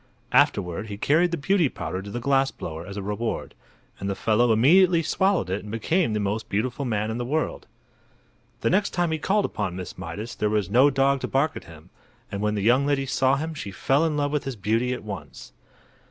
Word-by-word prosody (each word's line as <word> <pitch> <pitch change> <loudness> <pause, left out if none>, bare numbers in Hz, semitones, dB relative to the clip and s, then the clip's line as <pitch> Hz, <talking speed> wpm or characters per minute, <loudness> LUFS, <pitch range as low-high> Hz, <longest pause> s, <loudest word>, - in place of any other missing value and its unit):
Afterward 95 +2 +2
he 100 -1 -6
carried 160 +10 +3
the 170 - -2
Beauty 165 +1 +2
Powder 95 -5 -5
to 100 - -9
the 120 - -4
glass 135 +2 +2
blower 80 +2 -7
as 100 0 -7
a 100 - -4
reward, 105 +3 -3 0.5
and 100 - -3
the 100 - -1
fellow 115 +4 +2
immediately 165 - +5
swallowed 190 - +1
it 95 - -1
and 105 - -9
became 115 - 0
the 105 - 0
most 105 +2 -2
beautiful 125 +6 -1
man 110 -2 -1
in 115 - -4
the - - -1
world. 150 +6 -2 0.9
The - - +1
next 200 +3 +1
time 175 -2 +1
he 160 - -1
called 200 +5 +1
upon 100 -5 -3
Miss 90 -1 -7
Mydas 115 +4 -6
there 105 - +1
was 105 -2 -1
no 130 +6 +6
dog 135 0 +2
to - - -2
bark 145 +4 +1
at - - -8
him, 80 +2 -15 0.4
and 100 - -4
when 105 0 0
the 100 - -2
young 130 +6 +4
lady 140 -1 +1
saw 130 0 +2
him 160 +3 -3
she 140 -10 -6
fell 135 +9 +1
in 155 -2 0
love 145 -1 0
with 150 -1 -1
his 135 -2 -4
beauty 110 +4 0
at 125 - -4
once. 105 -2 -8
120 Hz, 225 wpm, -25 LUFS, 105-145 Hz, 0.9 s, no